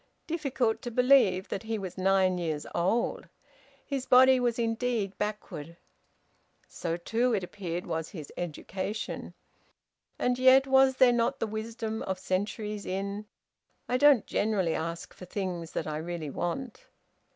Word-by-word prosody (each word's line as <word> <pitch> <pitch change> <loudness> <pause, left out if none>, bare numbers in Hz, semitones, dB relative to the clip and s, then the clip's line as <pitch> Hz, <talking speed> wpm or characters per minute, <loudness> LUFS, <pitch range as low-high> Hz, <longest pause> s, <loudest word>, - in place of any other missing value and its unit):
Difficult 270 -8 -1
to 240 - -4
believe 245 -7 +4
that - - -3
he 225 0 -3
was 190 -3 -6
nine 185 -1 +2
years 155 -4 -2
old! 190 +8 0 0.6
His 270 -3 -3
body 260 +1 +7
was 240 -2 0
indeed 225 -3 -1
backward. 170 -6 -5 0.9
So 170 -1 -3
too, 230 +7 +1
it 195 - -2
appeared, 180 -2 -5
was 160 0 -3
his 155 -6 -9
education. 185 +5 -5 0.8
And 250 0 0
yet 260 +1 +7
was 265 0 +5
there 255 -2 +6
not 240 +3 +1
the - - 0
wisdom 220 +1 -4
of 190 -1 -2
centuries 205 +3 -2
in, 200 +2 -3 0.6
"I 250 - +1
don't 285 -4 +6
generally 200 -6 0
ask 165 +1 -4
for 180 - -11
things 180 -3 -4
that - - -2
I 150 -1 -3
really 160 -2 -4
want?" 220 - -4
210 Hz, 140 wpm, -29 LUFS, 180-245 Hz, 0.9 s, body